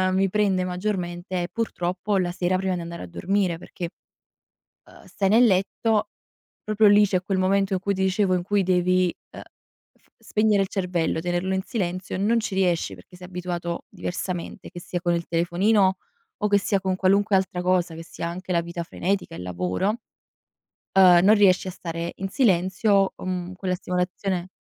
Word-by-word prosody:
mi 195 0 +2
prende 195 -3 +1
maggiormente, 180 -1 -3
è - - -3
purtroppo, 195 -3 -2
la 175 -1 0
sera 180 +1 0
prima 190 -1 -1
di 175 - -4
andare 170 - -7
a - - -7
dormire, 185 - -1
perché, 170 0 -7 1.0
uhm, - - -17
stai 195 -1 -1
nel 235 +4 +6
letto, 210 +2 +1 0.6
proprio 215 0 +3
lì 205 +1 +6
c'è 185 -2 0
quel 190 0 -1
momento 195 +1 +2
in 185 - +1
cui, 200 +1 -1
ti 190 - -3
dicevo 190 0 +2
in 175 - -1
cui 205 +1 +1
devi, 180 0 +2 0.2
ehm, - - -9 0.6
f - - -33
spegnere 210 -2 +2
il - - -4
cervello, 175 -4 -1
tenerlo 175 +2 -1
in 190 - 0
silenzio, 185 -5 -3
non 220 +4 +2
ci 215 - -4
riesci, 175 - +1
perché 90 - -16
sei 180 0 -11
abituato 175 -1 -4
diversamente, 175 -1 -5
che 175 - -9
sia 175 - -4
con 175 -1 +1
il 170 0 -1
telefonino, 190 +4 +2 0.4
o 210 - +2
che 205 0 +4
sia 200 0 0
con 190 -1 0
qualunque 200 +2 +3
altra 185 -1 -2
cosa, 180 -2 +1
che 165 - -8
sia 170 0 -6
anche 185 +2 -6
la 170 -1 +2
vita 170 0 -5
frenetica, 190 +3 -2
il - - -7
lavoro, 90 - -1 1.0
ehm, 180 -2 +7
non 210 +3 +7
riesci 190 -3 +4
a - - -3
stare 170 -1 -5
in 195 - -4
silenzio, 195 -2 +2
o - - -9
mhmm, 180 0 -3
quella 185 -1 -2
stimolazione 180 0 -2
185 Hz, 185 wpm, -24 LUFS, 175-195 Hz, 1.0 s, ehm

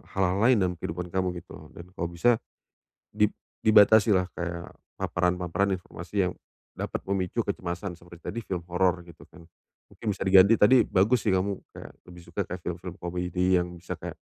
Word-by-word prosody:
hal-hal 95 -1 +1
lain 120 +3 +5
dalam 90 -2 0
kehidupan 85 +3 -4
kamu 95 -1 0
gitu. 80 -3 -13
Dan 85 +1 -11
kalau 85 - -2
bisa 115 +7 +3 0.7
di - - +3 0.3
dibatasi 110 0 +6
lah 95 -1 +2
kayak 85 -1 -5 0.2
paparan-paparan 90 +2 0
informasi 90 +2 -3
yang - - -7 0.4
dapat - - -3
memicu 95 -2 0
kecemasan 90 +1 -4
seperti 85 0 -15
tadi 115 - -4
film 90 -2 -3
horor 90 0 +1
gitu 85 -2 -15
kan. - - -15 0.5
Mungkin - - -14
bisa - - -16
diganti 95 +2 +7
tadi 125 +5 +6
bagus 105 +6 +2
sih 105 - +3
kamu 95 +1 0 0.2
kayak - - -10 0.2
lebih 90 0 -12
suka 85 +4 -2
kayak 90 0 -7
film-film 90 +1 -5
komedi 90 +1 0
yang 90 0 -2
bisa 85 +1 -6
kayak - - -8
90 Hz, 170 wpm, -27 LUFS, 85-100 Hz, 0.7 s, diganti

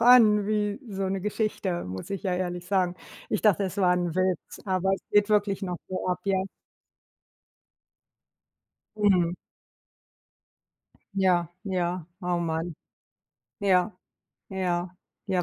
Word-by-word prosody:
an 225 -4 +7
wie 210 0 0
so 195 -1 -3
'ne 195 0 -1
Geschichte, 210 -3 -1
muss 95 - -6
ich 195 - -3
ja 185 -3 0
ehrlich 180 -1 -3
sagen. 185 -2 +2 0.3
Ich 210 - -1
dachte, 200 -2 +4
es 190 - -4
war 180 -2 +4
'n 175 -2 -1
Witz, 185 -2 -1
aber 190 0 +1
es - - -8
geht 205 0 +4
wirklich 205 -2 +2
noch 180 -2 -2
so 185 0 -3
ab, 180 0 0
ja? 190 -1 +2 2.5
Mhm. 185 -5 +3 1.8
Ja, 185 -3 +3 0.2
ja, 180 -3 -1 0.2
oh 180 -1 0
Mann. 165 0 -2 0.8
Ja, 190 -1 +2 0.5
ja, 180 -1 -2 0.3
ja, 185 -2 +1
185 Hz, 125 wpm, -27 LUFS, 180-200 Hz, 2.5 s, an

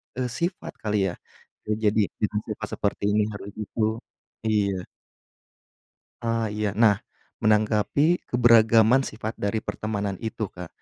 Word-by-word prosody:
eee, 125 -2 -2
sifat 175 +2 -2
kali 105 -4 0
ya - - -8 0.7
jadi 105 +1 +4 0.2
dengan 105 0 +1
sifat 110 0 -4
seperti 100 0 -2
ini 105 0 +3
harus 100 0 -7
gitu, 110 +1 -1 0.5
iya. 100 -3 +1 1.4
Ah 115 -2 0
iya, 105 -2 -2
nah 105 -3 +5 0.4
menanggapi 110 +10 +2
keberagaman 115 +1 +5
sifat 110 +1 -6
dari 105 +2 -1
pertemanan 100 -3 -3
itu 110 -2 -4
Kak, 90 -1 -8
110 Hz, 120 wpm, -25 LUFS, 105-115 Hz, 1.4 s, nah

